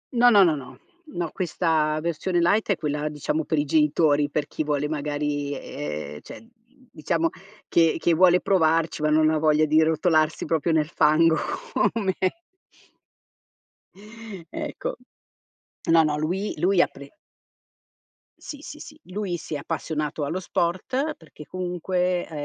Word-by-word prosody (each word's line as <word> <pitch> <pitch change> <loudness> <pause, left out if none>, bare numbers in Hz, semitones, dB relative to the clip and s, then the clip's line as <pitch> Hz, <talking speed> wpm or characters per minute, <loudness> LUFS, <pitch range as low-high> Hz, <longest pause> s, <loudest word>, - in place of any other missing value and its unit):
No, 245 +1 +6
no, 205 -4 +7
no, 165 -4 +3
no, 140 -3 -10 0.3
no 175 - -4
questa 160 -3 0
versione 170 +2 -1
light 200 +7 +2
è 200 - +3
quella 150 -1 -2
diciamo 150 +1 -2
per 160 - -1
i 145 - +1
genitori, 150 -1 +2
per 150 0 -1
chi 155 - -4
vuole 150 -1 -1
magari 145 -1 -2
ehm, 75 0 -6
cioè 225 - -12 0.5
diciamo 165 +1 0 0.4
che 165 -1 +3
che 170 - +2
vuole 180 +1 +5
provarci, 165 -5 +1
ma 155 - +2
non 155 +1 +4
ha 155 - +1
voglia 155 0 +3
di 155 +1 +4
rotolarsi 160 -1 +2
proprio 165 0 0
nel 155 -1 +1
fango, 160 +2 +4 0.6
come 200 -5 -1 2.4
Ecco. - - -4 0.9
No, 165 -1 +6
no, 150 -1 0
lui 180 +7 -2
lui 180 +3 +2
ha - - +6
pre 140 0 -13 1.3
Sì, 290 - -9
sì, 300 0 -10
sì 305 0 -12
lui 185 -1 -3
si 160 - -8
è - - -1
appassionato 150 +1 -3
allo 170 +6 -2
sport, 190 - -1
perché 155 -2 -14
comunque 180 0 -2
è - - -19
160 Hz, 145 wpm, -24 LUFS, 150-180 Hz, 2.4 s, no